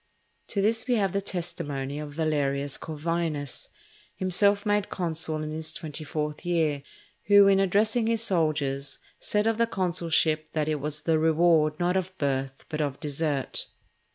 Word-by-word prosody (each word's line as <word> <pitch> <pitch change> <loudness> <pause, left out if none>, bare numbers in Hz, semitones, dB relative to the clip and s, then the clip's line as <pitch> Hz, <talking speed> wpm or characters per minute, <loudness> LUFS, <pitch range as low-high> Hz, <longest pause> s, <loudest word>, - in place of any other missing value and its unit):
To 200 -3 -1
this 225 +2 +1
we 250 - +3
have 195 -5 +1
the 200 - 0
testimony 150 -7 -3
of 150 -1 -6
Valerius 145 -3 0
Corvinus, 160 -2 -2 0.5
himself 200 +2 +2
made 205 -1 +1
consul 160 -3 -2
in 155 - -4
his 160 0 -2
twenty 155 -2 -6
fourth 150 0 -3
year, 160 -5 +1 0.4
who, 205 -1 +7
in 195 -1 +5
addressing 215 +4 +2
his 230 -1 +1
soldiers, 150 -7 0 0.2
said 210 0 0
of 225 0 +1
the 230 - +3
consulship 165 -5 0
that 155 -1 0
it 155 -1 0
was 150 +2 -4
"the 160 0 +2
reward 160 -1 +3
not 175 +1 +1
of 185 0 -2
birth 135 -2 -2
but 155 0 -3
of 140 -2 -2
desert." 145 -2 -2
160 Hz, 155 wpm, -27 LUFS, 150-190 Hz, 0.5 s, who